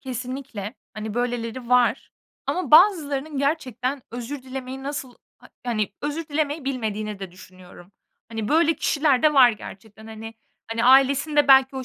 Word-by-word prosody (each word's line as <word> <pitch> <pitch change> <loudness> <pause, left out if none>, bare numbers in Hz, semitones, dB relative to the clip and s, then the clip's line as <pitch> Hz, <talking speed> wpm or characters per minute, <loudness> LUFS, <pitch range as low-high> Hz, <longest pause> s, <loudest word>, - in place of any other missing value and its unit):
kesinlikle. 255 -3 -6 0.2
Hani, 215 0 -6
böyleleri 240 0 -3
var 250 -1 +2 0.4
ama 360 -7 -2
bazılarının 305 -5 +4
gerçekten 270 -2 -2
özür 245 +3 -6
dilemeyi 260 0 -7
nasıl 275 -3 -5 0.2
ha - - -17 0.2
hani, 215 -4 -1
özür 295 +2 -4
dilemeyi 295 -1 -2
bilmediğini 215 -6 -3
de 190 -2 -7
düşünüyorum. 185 0 -15 0.4
Hani, 220 -2 -4
böyle 325 +1 +3
kişiler 290 -3 +1
de 300 -1 +4
var 255 -3 +7
gerçekten. 215 0 -11
Hani 225 0 -9 0.4
hani, 230 +1 -1
ailesinde 280 +3 +4
belki 265 0 +6
o 260 - -4
255 Hz, 140 wpm, -23 LUFS, 225-285 Hz, 0.4 s, var